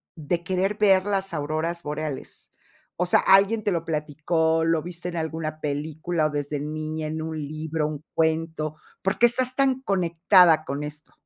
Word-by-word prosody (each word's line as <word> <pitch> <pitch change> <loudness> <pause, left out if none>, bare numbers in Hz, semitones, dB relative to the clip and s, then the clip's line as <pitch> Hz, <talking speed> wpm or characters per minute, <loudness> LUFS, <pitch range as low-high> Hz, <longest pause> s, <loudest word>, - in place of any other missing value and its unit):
de 170 +2 -2
querer 190 +3 0
ver 195 -2 +4
las 195 -3 -1
auroras 155 +3 -2
boreales?, 150 -1 -6 0.5
o 180 +1 0
sea, - - +5
¿alguien 200 +3 +4
te 205 - +1
lo 165 -1 -2
platicó, 160 +1 0
lo 165 -1 +1
viste 175 0 -6
en 170 - -5
alguna 160 -1 -3
película, 155 +2 -1
o - - -4
desde 145 0 -3
niña, 155 +1 -4
en 160 +1 -4
un 160 0 -4
libro, 155 0 -2
un 150 -1 -6
cuento? 160 -1 0 0.3
¿Por 190 +2 0
qué 240 - +6
estás 255 +2 +2
tan 265 -1 +2
conectada 175 -4 +4
con 145 -1 -4
esto? 150 +1 -9
160 Hz, 170 wpm, -25 LUFS, 155-180 Hz, 0.5 s, qué